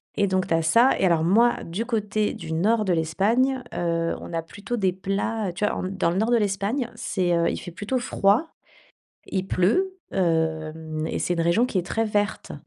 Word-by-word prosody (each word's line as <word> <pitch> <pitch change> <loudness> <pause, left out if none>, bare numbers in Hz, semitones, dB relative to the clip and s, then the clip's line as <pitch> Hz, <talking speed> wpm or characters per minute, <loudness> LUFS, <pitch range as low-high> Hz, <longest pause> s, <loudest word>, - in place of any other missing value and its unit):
Et 200 - +2
donc, 185 0 0
tu 165 - 0
as 165 - +3
ça. 230 +11 +5
Et - - +3
alors, 170 -3 +3
moi, 230 +8 +4
du 185 +8 -4
côté 215 -3 -1
du 160 - -8
nord 215 +7 +2
de 185 - +2
l'Espagne, 225 +11 +1
heu, 165 -1 -1
on - - -8
a 165 - 0
plutôt 205 +7 -5
des 190 -4 +1
plats, 195 +3 -2
heu, - - -6
tu 200 +4 -1
vois, - - 0
on - - -3
dans 185 -2 0
le 175 - -2
nord 220 +3 +1
de 240 - +5
l'Espagne, 210 +5 -1
c'est, 180 -3 -1
heu, 170 0 +2
il - - -3
fait 175 - -8
plutôt 205 +9 -2
froid, 240 +4 +2 0.8
il 190 -1 -2
pleut, 370 - +1 0.2
hem, 160 -2 -1
et - - -2
c'est 175 - 0
une 170 - -1
région 170 +9 +3
qui 215 - -1
est 175 - -2
très 225 +3 0
verte. 210 -1 -1
195 Hz, 220 wpm, -24 LUFS, 170-225 Hz, 0.8 s, ça